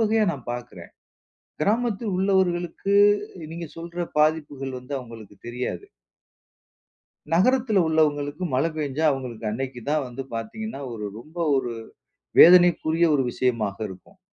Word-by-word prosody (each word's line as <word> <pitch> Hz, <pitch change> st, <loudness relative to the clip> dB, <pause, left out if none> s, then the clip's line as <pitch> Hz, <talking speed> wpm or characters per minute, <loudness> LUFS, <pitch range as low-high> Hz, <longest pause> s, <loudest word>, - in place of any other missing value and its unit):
வகையா 220 Hz, 0 st, +3 dB
நான் 140 Hz, -6 st, -7 dB
பார்க்குறேன். 120 Hz, -8 st, -8 dB, 0.7 s
கிராமத்தில் 220 Hz, 0 st, 0 dB
உள்ளவர்களுக்கு, 190 Hz, 0 st, +1 dB, 0.6 s
நீங்க 170 Hz, -2 st, -6 dB
சொல்ற 170 Hz, +1 st, -5 dB
பாதிப்புகள் 145 Hz, -3 st, 0 dB
வந்து 125 Hz, +3 st, -11 dB
அவங்களுக்கு 115 Hz, -5 st, -11 dB
தெரியாது. 125 Hz, -, -4 dB, 1.5 s
நகரத்தில 230 Hz, +2 st, +3 dB
உள்ளவங்களுக்கு 150 Hz, 0 st, +1 dB
மழை 140 Hz, +6 st, +2 dB
பெஞ்சா 150 Hz, +1 st, -2 dB
அவங்களுக்கு 125 Hz, -5 st, -5 dB
அன்னைக்கு 125 Hz, +2 st, -4 dB
தான் 150 Hz, -2 st, +1 dB
வந்து 125 Hz, +2 st, -6 dB
பார்த்தீங்கன்னா, 140 Hz, -, -5 dB
ஒரு 105 Hz, -2 st, -6 dB
ரொம்ப 155 Hz, +8 st, -15 dB, 0.2 s
ஒரு 120 Hz, -3 st, -1 dB, 0.7 s
வேதனைக்குரிய 170 Hz, -1 st, +7 dB
ஒரு 135 Hz, -, +2 dB
விஷயமாக 115 Hz, -6 st, -1 dB
இருக்கும். 95 Hz, -, -14 dB
150 Hz, 115 wpm, -24 LUFS, 125-180 Hz, 1.5 s, வேதனைக்குரிய